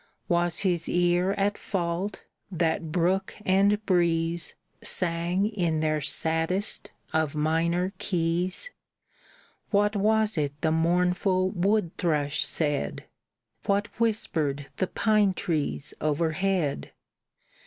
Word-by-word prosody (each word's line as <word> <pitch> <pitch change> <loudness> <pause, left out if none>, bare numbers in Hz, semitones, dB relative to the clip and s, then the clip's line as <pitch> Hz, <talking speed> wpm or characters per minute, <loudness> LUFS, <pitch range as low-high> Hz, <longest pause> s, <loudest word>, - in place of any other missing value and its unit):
Was 175 -2 +1
his 180 -4 0
ear 175 +2 +2
at 205 0 0
fault 180 +1 -2 0.3
that 165 -2 0
brook 185 +3 +1
and 200 +3 +3
breeze 170 -2 +1 0.3
Sang 175 +2 +1
in 175 -7 0
their 155 -1 +1
saddest 165 +7 -1 0.2
of 160 -2 +1
minor 165 +4 +1
keys? 180 - -1 1.0
What 205 0 +2
was 215 -2 +2
it 145 -1 -2
the 160 - +2
mournful 180 +3 +2
wood 195 -1 +1
thrush 150 -3 0
said? 145 - -1 0.6
What 200 +1 +1
whispered 155 -11 0
the 185 - 0
pine 210 -2 +2
trees 155 -6 -2
overhead? 160 - 0
175 Hz, 100 wpm, -27 LUFS, 160-195 Hz, 1.0 s, and